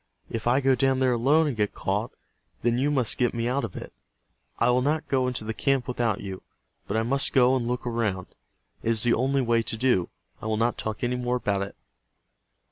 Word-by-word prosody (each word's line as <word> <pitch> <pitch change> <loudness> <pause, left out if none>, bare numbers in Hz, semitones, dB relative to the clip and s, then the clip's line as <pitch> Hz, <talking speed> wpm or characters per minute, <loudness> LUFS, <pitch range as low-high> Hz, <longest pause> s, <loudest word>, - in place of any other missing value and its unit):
If 115 0 -3
I 130 +3 +3
go 135 0 +4
down 135 +1 +2
there 130 -1 +3
alone 140 +7 +3
and 145 -5 -1
get 105 -2 -1
caught - - -1 0.5
then 120 +1 +2
you 140 +3 +2
must 130 -6 0
get 120 -1 +1
me 115 0 -1
out 130 +2 0
of 105 -6 -5
it. - - -8 0.6
I - - +3
will 125 +1 +3
not 150 +4 0
go 130 -2 +1
into 125 -3 -2
the 110 +1 -3
camp 135 +1 0
without 120 -4 -1
you, 95 -2 -6 0.5
but 105 - -1
I 110 - +1
must 135 +4 +1
go 130 -1 +5
and 120 -3 -1
look 125 +1 -2
around. 110 -6 -1 0.6
It - - -2
is 115 -2 +2
the 120 -1 +4
only 135 +3 +1
way 115 -1 +2
to 115 - -4
do. 115 -8 +2 0.3
I - - -5
will 110 0 0
not 115 +1 0
talk 110 +1 -4
any 125 +1 0
more 125 0 -1
about 100 -5 0
it." 100 - -5
120 Hz, 225 wpm, -26 LUFS, 115-130 Hz, 0.6 s, go